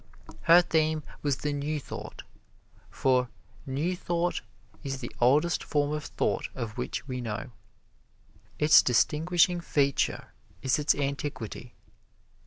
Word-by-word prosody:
Her 170 +1 +7
theme 155 -2 +1 0.2
was 145 -3 0
the 150 -1 -2
New 145 +2 -2
Thought, - - -8 0.7
for 125 -2 +1 0.4
New 150 +7 -1
Thought 175 0 -1 0.4
is 135 -2 -3
the 120 - -6
oldest 150 +8 +3
form 145 -1 0
of 150 -1 -3
thought - - -1
of 115 -4 -5
which - - -4
we 125 -2 -4
know. 115 +2 -5 1.1
Its 150 +1 +7
distinguishing 170 +7 +2
feature 140 -4 0 0.3
is 130 +2 +2
its 150 - +3
antiquity. 140 -6 -4
145 Hz, 120 wpm, -28 LUFS, 130-155 Hz, 1.1 s, Her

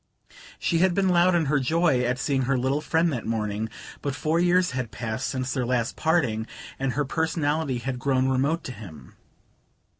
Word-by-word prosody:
She 170 - 0
had 185 0 +3
been 195 -1 +2
loud 175 0 +4
in 165 -2 +2
her 145 +1 +2
joy 155 -1 +2
at 125 0 0
seeing 135 0 0
her 135 - +3
little 135 +4 0
friend 160 +1 +1
that 120 - -4
morning, 110 -1 -2 0.3
but 140 -2 -2
four 155 +4 0
years 180 +1 +3
had 130 -3 -3
passed 110 +3 -4
since 130 -1 -2
their 130 - 0
last 120 -1 0
parting, 125 -10 +1 0.3
and 135 -1 -1
her 145 0 0
personality 155 -2 0
had 125 +1 -4
grown 130 -1 +1
remote 140 +5 +1
to - - -5
him. 80 - -11
135 Hz, 185 wpm, -25 LUFS, 125-160 Hz, 0.3 s, loud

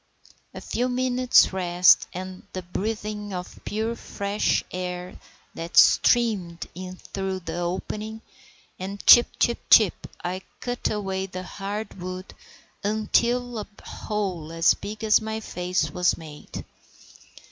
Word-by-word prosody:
A - - -6
few 250 +2 -1
minutes' 255 -3 +4
rest 180 -1 +4
and 185 +1 -7
the 185 - -4
breathing 210 +2 -4
of 180 0 -6
the - - -18
pure, 220 +2 -2
fresh 200 -2 -1
air 180 0 -5 0.3
that 165 +1 -6
streamed 200 -8 +4
in 185 0 -7
through 190 0 -4
the 165 0 -5
opening, 210 +5 -4 0.6
and 195 +2 -6
chip, 240 - +9
chip, 235 - +2
chip, 215 -6 +5 0.2
I 185 +2 -3 0.2
cut 245 -1 -2
away 190 -2 -2
at 195 - -15
the 185 0 -4
hard 200 0 -6
wood 185 +1 -6 0.5
until 235 +3 +1
a 210 - -6 0.2
hole 185 -7 -4
as 165 0 +4
big 215 +2 -7
as 220 +1 +5
my 220 0 -3
face 180 -6 -2
was 180 +1 +2
made. 155 -3 -9
195 Hz, 135 wpm, -25 LUFS, 180-220 Hz, 0.6 s, chip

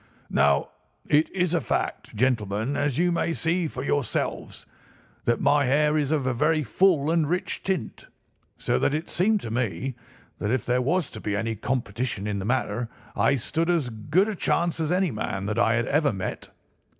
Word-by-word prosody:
"Now, 70 0 +3 0.4
it 150 +2 +3
is 180 -2 0
a 170 - +2
fact, - - -3
gentlemen, 110 +1 0
as 145 -3 0
you 175 +1 +3
may 170 -1 0
see 170 +1 0
for 130 -3 -6
yourselves, 140 -3 -2 0.6
that 120 - +2
my 145 -1 +3
hair 150 +3 +3
is 150 -2 +1
of 150 -4 +1
a 130 - +1
very 155 +5 +2
full 160 - +3
and 165 -3 +2
rich 180 +1 -1
tint, 185 - -3 0.5
so - - 0
that 145 - +1
it 155 +2 -4
seemed 205 +3 +2
to 110 - -6
me 115 0 -2 0.5
that 105 - -2
if 130 -1 0
there 125 0 +2
was 165 +4 0
to - - -8
be 105 - -2
any 110 +2 -1
competition 115 -2 -2
in 105 -1 -2
the 95 - -4
matter 120 -1 -1 0.3
I 140 - +3
stood 160 +6 -1
as 160 -8 +1
good 150 - +1
a 220 - -2
chance 170 -3 0
as 160 0 0
any 180 -2 +2
man 100 -3 -3
that 105 +1 -1
I 110 - +3
had 120 -1 +1
ever 145 +1 +2
met. 95 -2 -5
140 Hz, 190 wpm, -25 LUFS, 115-165 Hz, 0.6 s, Now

